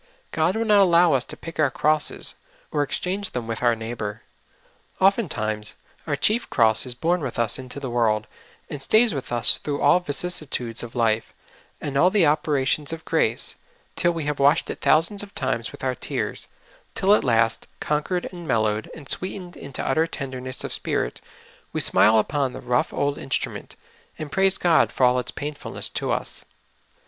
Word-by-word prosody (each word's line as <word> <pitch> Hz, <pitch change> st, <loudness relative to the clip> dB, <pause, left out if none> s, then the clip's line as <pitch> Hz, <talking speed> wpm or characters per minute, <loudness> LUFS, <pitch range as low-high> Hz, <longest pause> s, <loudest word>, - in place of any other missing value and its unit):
God 160 Hz, +4 st, +1 dB
will 225 Hz, +1 st, -1 dB
not 210 Hz, -2 st, +5 dB
allow" 175 Hz, -3 st, +5 dB
us 130 Hz, -2 st, +1 dB
to -, -, -9 dB
pick 165 Hz, -1 st, -9 dB
our 150 Hz, -3 st, +4 dB
crosses, 155 Hz, +3 st, 0 dB, 0.4 s
or 150 Hz, -, -1 dB
to 145 Hz, -, -7 dB
exchange 195 Hz, +2 st, -2 dB
them 125 Hz, -2 st, -3 dB
with 115 Hz, 0 st, -5 dB
our 120 Hz, -1 st, +3 dB
neighbor. 110 Hz, -2 st, -6 dB, 0.8 s
Oftentimes 120 Hz, -, 0 dB, 0.3 s
our 145 Hz, -, 0 dB
chief 215 Hz, -, +1 dB
cross 110 Hz, +2 st, +4 dB
is 125 Hz, -, -4 dB
born 170 Hz, +7 st, 0 dB
with 130 Hz, -5 st, -5 dB
us 115 Hz, +2 st, +1 dB
into 130 Hz, +2 st, -6 dB
the 140 Hz, -, -5 dB
world, 110 Hz, -3 st, +1 dB, 0.4 s
and 145 Hz, -, -7 dB
stays 220 Hz, -, +4 dB
with 135 Hz, -4 st, -5 dB
us 120 Hz, -3 st, +5 dB
through 145 Hz, -1 st, -3 dB
all 145 Hz, +5 st, +4 dB
vicissitudes 145 Hz, -7 st, -1 dB
of 120 Hz, 0 st, -9 dB
life, 115 Hz, -2 st, 0 dB, 0.4 s
and 140 Hz, -1 st, -3 dB
all 180 Hz, -, +5 dB
the 190 Hz, -3 st, +3 dB
operations 145 Hz, -1 st, +1 dB
of 165 Hz, 0 st, -7 dB
grace, -, -, +1 dB, 0.4 s
till 175 Hz, -, +3 dB
we 165 Hz, -2 st, -4 dB
have 145 Hz, -1 st, -3 dB
washed 145 Hz, +4 st, +3 dB
it -, -, -9 dB
thousands 170 Hz, +6 st, +3 dB
of 205 Hz, -1 st, -10 dB
times 115 Hz, -3 st, -2 dB
with -, -, -12 dB
our 130 Hz, -1 st, 0 dB
tears, -, -, -4 dB, 0.5 s
till 195 Hz, +2 st, +3 dB
at -, -, +3 dB
last, 115 Hz, -2 st, +2 dB
conquered 150 Hz, +4 st, -1 dB
and 175 Hz, -2 st, -9 dB
mellowed 110 Hz, -3 st, 0 dB
and 150 Hz, -4 st, -11 dB
sweetened 185 Hz, +1 st, -2 dB
into 140 Hz, -2 st, -5 dB
utter 160 Hz, +5 st, +2 dB
tenderness 130 Hz, -4 st, -4 dB
of -, -, -4 dB
spirit, -, -, -3 dB, 0.5 s
we -, -, -1 dB
smile 110 Hz, +1 st, +4 dB
upon 135 Hz, +4 st, 0 dB
the -, -, -7 dB
rough 125 Hz, 0 st, 0 dB
old 145 Hz, 0 st, -1 dB
instrument, 135 Hz, -, -4 dB, 0.4 s
and 155 Hz, -2 st, -7 dB
praise 195 Hz, +2 st, +4 dB
God 170 Hz, -3 st, +3 dB
for -, -, -2 dB
all 125 Hz, 0 st, +3 dB
its 125 Hz, -, -4 dB
painfulness 145 Hz, 0 st, -2 dB
to -, -, -2 dB
us. -, -, -3 dB
145 Hz, 180 wpm, -23 LUFS, 120-170 Hz, 0.8 s, not